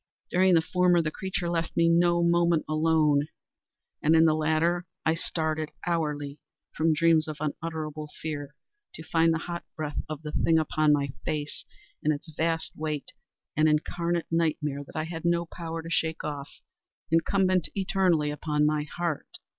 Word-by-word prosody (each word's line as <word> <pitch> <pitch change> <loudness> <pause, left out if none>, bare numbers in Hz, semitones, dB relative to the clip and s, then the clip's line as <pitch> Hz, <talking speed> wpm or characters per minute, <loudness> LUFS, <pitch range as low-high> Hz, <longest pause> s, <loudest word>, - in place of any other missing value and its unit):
During 185 0 +5
the 165 - +4
former 180 0 +3
the 160 -2 0
creature 190 +1 -3
left 170 -1 -2
me 165 0 +5
no 170 0 +4
moment 170 -1 +3
alone, 155 -2 +3 0.7
and 155 +2 +4
in 160 0 +6
the 160 - +5
latter 160 +3 +1 0.2
I 160 - +4
started 155 -2 -2 0.2
hourly 150 -4 -2 0.4
from 160 0 +3
dreams 160 0 +4
of 155 -1 -5
unutterable 155 0 -4
fear 150 -2 -5 0.4
to 160 - -8
find 165 0 +3
the 165 - +1
hot 170 0 -4
breath 150 -2 -3
of 155 0 -6
the 150 - -5
thing 160 +1 +3
upon 155 -1 +2
my 140 -1 +2
face, 150 -1 -3 0.4
and 155 - +2
its 155 +2 -5
vast 165 0 -1
weight—an 155 0 -3
incarnate 170 +2 0
nightmare 150 -3 0
that - - -16
I 155 - -1
had 165 0 -6
no 170 0 +2
power 165 -1 -6
to 165 - -7
shake 160 -1 0
off—incumbent 165 +4 -1
eternally 185 -6 +2
upon 150 0 0
my 150 0 +1
_heart! 170 -4 -3
160 Hz, 155 wpm, -27 LUFS, 150-170 Hz, 0.7 s, in